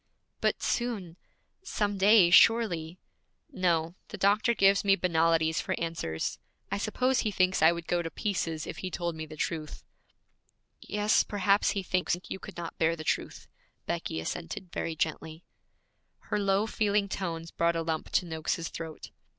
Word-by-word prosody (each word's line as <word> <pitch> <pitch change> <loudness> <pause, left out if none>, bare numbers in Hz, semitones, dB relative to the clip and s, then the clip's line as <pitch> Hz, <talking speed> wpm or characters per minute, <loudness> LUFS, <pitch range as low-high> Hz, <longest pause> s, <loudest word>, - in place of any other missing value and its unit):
'But - - 0
soon 215 -9 -2 0.5
some 205 - -2
day, 195 -3 +6
surely 180 -4 +4 0.3
' - - -42
'No. 170 - 0
The - - -8
doctor 210 +4 +3
gives 195 -1 +4
me 195 -1 +5
banalities 165 -3 +2
for - - -3
answers. 165 - -3 0.3
I 200 - -1
suppose 255 +5 +1
he 220 - 0
thinks 185 -2 +1
I 160 - +7
would 170 -1 -5
go 175 0 0
to 165 - -4
pieces 165 -5 -2
if - - -7
he 185 - -4
told 170 -1 -3
me 160 0 -6
the 155 - -10
truth.' 155 -1 -4 1.0
'Yes, 210 +1 +2
perhaps 200 0 +2
he 195 - -1
thinks 180 -1 0
you 190 - -5
could - - -10
not 170 -1 -6
bear 165 +1 +2
the 155 - -7
truth,' - - -2 0.4
Becky 80 - -3
assented 80 - -5
very 165 - -3
gently. 160 +1 -3 0.7
Her - - -3
low, 200 +1 +2
feeling 210 -2 +1
tones 165 -4 -4
brought 170 0 +1
a 165 - -1
lump 160 -1 -3
to - - +2
Noakes's 165 0 -3
throat. 160 -2 -8
175 Hz, 165 wpm, -29 LUFS, 165-200 Hz, 1.0 s, I